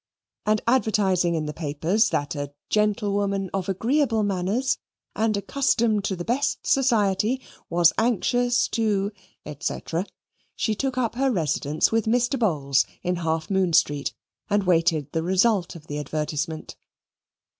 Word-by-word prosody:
And 215 Hz, 0 st, +2 dB
advertising 200 Hz, -8 st, +2 dB
in 155 Hz, -1 st, -1 dB
the 150 Hz, -, -4 dB
papers 165 Hz, +8 st, +1 dB
that 145 Hz, 0 st, -1 dB
a 145 Hz, -2 st, -4 dB, 0.2 s
"Gentlewoman 200 Hz, -2 st, 0 dB
of 195 Hz, -1 st, -2 dB
agreeable 225 Hz, +3 st, +1 dB
manners, 205 Hz, +7 st, 0 dB, 0.4 s
and 220 Hz, -1 st, +1 dB
accustomed 225 Hz, -1 st, +1 dB
to 195 Hz, -, -1 dB
the 175 Hz, -1 st, -6 dB
best 270 Hz, +5 st, -1 dB
society, 230 Hz, -2 st, +2 dB, 0.3 s
was 170 Hz, 0 st, +4 dB
anxious 245 Hz, +2 st, +2 dB
to," 205 Hz, -3 st, 0 dB, 0.5 s
&c., -, -, -2 dB, 0.8 s
she 220 Hz, -, 0 dB
took 260 Hz, +4 st, -2 dB
up 240 Hz, -3 st, 0 dB
her 265 Hz, +3 st, +1 dB
residence 155 Hz, -, 0 dB
with 225 Hz, -1 st, +1 dB
Mr. 245 Hz, +3 st, +1 dB
Bowls 140 Hz, -, +2 dB, 0.2 s
in 180 Hz, 0 st, 0 dB
Half 160 Hz, 0 st, -2 dB
Moon 190 Hz, -3 st, +1 dB
Street, 145 Hz, -3 st, +2 dB, 0.3 s
and 205 Hz, -1 st, +2 dB
waited 165 Hz, -5 st, +2 dB
the 160 Hz, -, -1 dB
result 190 Hz, +1 st, +2 dB
of 155 Hz, -2 st, -11 dB
the 145 Hz, -1 st, -4 dB
advertisement. 155 Hz, +2 st, -3 dB
195 Hz, 135 wpm, -24 LUFS, 165-225 Hz, 0.8 s, was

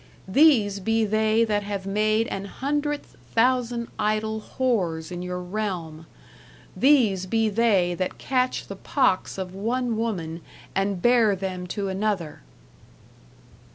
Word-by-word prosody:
These 210 Hz, -4 st, +4 dB
be 225 Hz, +3 st, +1 dB
they 215 Hz, +2 st, +2 dB
that 210 Hz, -2 st, 0 dB
have 200 Hz, -1 st, -4 dB
made 215 Hz, +3 st, +1 dB
an 195 Hz, 0 st, -4 dB
hundredth 290 Hz, +6 st, -3 dB, 0.2 s
thousand 240 Hz, 0 st, +2 dB
idell 215 Hz, +1 st, 0 dB
hores 180 Hz, -12 st, -1 dB
in 175 Hz, 0 st, -5 dB
your 180 Hz, 0 st, -4 dB
realme. 180 Hz, -4 st, -4 dB, 0.7 s
These 225 Hz, -10 st, +3 dB
be 225 Hz, +2 st, +1 dB
they 200 Hz, -5 st, +2 dB
that 185 Hz, +1 st, -3 dB
catche 255 Hz, -1 st, 0 dB
the 200 Hz, -, -7 dB
pokkes 185 Hz, 0 st, 0 dB
of 185 Hz, -1 st, -5 dB
one 235 Hz, +4 st, -1 dB
woman, 175 Hz, -8 st, -3 dB, 0.3 s
and 195 Hz, -1 st, -1 dB
here 235 Hz, -4 st, +5 dB
them 185 Hz, -1 st, -4 dB
to 195 Hz, +2 st, -3 dB
an 190 Hz, +2 st, -3 dB
other. 190 Hz, -8 st, -2 dB
210 Hz, 130 wpm, -25 LUFS, 185-230 Hz, 0.7 s, here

